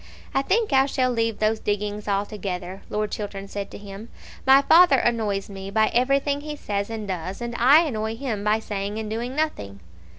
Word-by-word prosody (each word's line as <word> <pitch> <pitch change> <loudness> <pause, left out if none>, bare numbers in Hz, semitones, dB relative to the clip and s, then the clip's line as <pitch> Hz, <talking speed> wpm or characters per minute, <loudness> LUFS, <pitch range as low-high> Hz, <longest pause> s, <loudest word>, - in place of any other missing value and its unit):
"I 270 - +2
think 410 +4 +1
I 265 0 +5
shall 255 -2 +1
leave 230 -2 0
those 215 +1 +1
diggings 210 0 -3
altogether," 195 -2 -3
Lord 210 0 -2
Chiltern 200 -2 -5
said 200 0 -5
to - - -9
him. 205 +2 -10 0.4
"My 270 +1 +7
father 330 -2 +6
annoys 215 -5 0
me 195 -1 -8
by 220 +1 +2
everything 275 +3 +1
he 300 0 -6
says 200 -7 -3
and 220 -2 -5
does, 185 0 -4
and 240 0 -4
I 275 +7 +7
annoy 220 -7 -2
him 225 -5 -4
by 210 +1 +3
saying 205 0 -4
and 220 -1 -4
doing 240 +4 -3
nothing." 100 - -2
215 Hz, 190 wpm, -24 LUFS, 200-260 Hz, 0.4 s, My